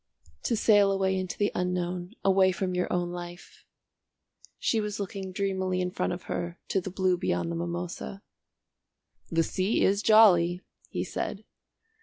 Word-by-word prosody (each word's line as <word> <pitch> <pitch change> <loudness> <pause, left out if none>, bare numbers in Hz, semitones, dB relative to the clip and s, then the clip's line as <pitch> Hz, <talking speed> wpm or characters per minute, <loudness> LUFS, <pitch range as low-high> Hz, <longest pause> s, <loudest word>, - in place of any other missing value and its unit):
To 235 - +2
sail 205 -2 +5
away 190 -1 +1
into 185 -1 -3
the 205 - +1
unknown, 180 +2 -2
away 190 -1 +5
from 185 0 -2
your 180 0 -1
own 175 -1 0
life 175 0 -9 0.5
" - - -57 0.3
She 225 - +1
was 210 0 -4
looking 195 -1 -5
dreamily 190 -1 -1
in 180 0 -1
front - - -1
of 175 0 -5
her 170 0 -4
to 195 - +1
the 190 - -5
blue 185 -1 +1
beyond 170 -2 -1
the - - -3
mimosa. 175 +3 -5 1.1
"The 165 0 +2
sea 190 +6 0
is 200 +1 +3
jolly," 185 -6 +5 0.3
he - - -2
said. - - -4
185 Hz, 160 wpm, -28 LUFS, 175-195 Hz, 1.1 s, sail